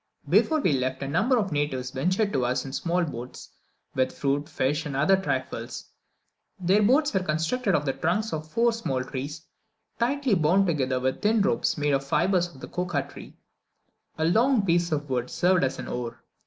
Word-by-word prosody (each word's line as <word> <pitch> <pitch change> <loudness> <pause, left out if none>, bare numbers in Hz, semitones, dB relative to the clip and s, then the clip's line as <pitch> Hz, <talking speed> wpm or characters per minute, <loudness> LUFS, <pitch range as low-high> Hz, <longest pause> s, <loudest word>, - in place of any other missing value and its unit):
Before 315 -1 +3
we 180 - +2
left, 130 0 -1
a - - -3
number 215 - +2
of 200 -5 -1
natives 135 -4 -2
ventured 185 +10 0
to 130 - +1
us 125 +2 0
in 135 - -7
small 175 +4 0
boats 125 -6 -7 0.4
with 130 0 +1
fruit, 145 +2 -1
fish, 150 +1 0
and 140 - -5
other 150 +8 +4
trifles. 190 0 -4 0.7
Their 190 +3 +3
boats 275 +8 +3
were 190 - +3
constructed 180 +5 0
of 150 - 0
the 135 - 0
trunks 195 +11 -1
of 155 0 -4
four 235 +7 +2
small 135 - -2
trees, 145 +5 -6 0.5
tightly 265 +1 +1
bound 180 +3 +3
together 135 -7 0
with 130 +1 -1
thin 215 0 +3
ropes 120 - +1
made 145 0 +1
of 135 - +2
the 135 - -14
fibres 180 +3 +2
of 135 -7 -16
the - - -7
cocoa 175 -6 -2
tree; 145 - -13 0.8
a 160 - 0
long 225 +5 +3
piece 170 -1 +2
of 150 -1 -1
wood 125 -2 -2
served 180 0 +2
as 135 - 0
an - - -6
oar. 120 -1 -5
160 Hz, 195 wpm, -26 LUFS, 135-195 Hz, 0.8 s, other